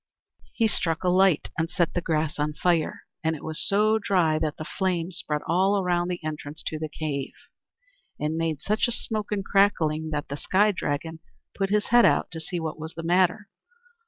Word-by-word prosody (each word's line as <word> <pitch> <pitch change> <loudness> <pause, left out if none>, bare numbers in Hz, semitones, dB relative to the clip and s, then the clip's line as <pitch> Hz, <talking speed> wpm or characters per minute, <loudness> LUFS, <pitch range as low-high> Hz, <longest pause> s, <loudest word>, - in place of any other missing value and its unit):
He 225 - +2
struck 165 -5 -1
a 180 - +2
light, 185 -3 +3
and 165 0 0
set 175 -2 0
the 175 - 0
grass 155 -2 -1
on 150 +1 0
fire, 170 0 0 0.2
and 160 0 +1
it 150 - -10
was 160 -1 -2
so 215 +2 +3
dry 175 -7 +2
that 155 -1 -2
the 155 - -6
flames 180 -1 -2
spread 150 -1 -2
all 190 +4 +2
around 175 -2 +1
the 180 -2 -4
entrance 150 -1 -6
to 155 - -3
the 155 0 -4
cave, 145 -3 -4 0.9
and 150 +1 -1
made 160 -3 -2
such 215 +4 +1
a - - -2
smoke 215 -3 -3
and 200 -2 -1
crackling 160 -6 +2
that 150 -1 -3
the 140 - -5
Sky 205 +7 +3
Dragon 160 -2 -3 0.3
put 195 -1 -1
his 210 0 +1
head 240 0 +6
out - - +3
to 165 - -5
see 175 +2 -3
what 160 -1 -4
was 160 +1 -7
the 165 - -6
matter. 180 +4 +2
165 Hz, 200 wpm, -26 LUFS, 155-195 Hz, 0.9 s, head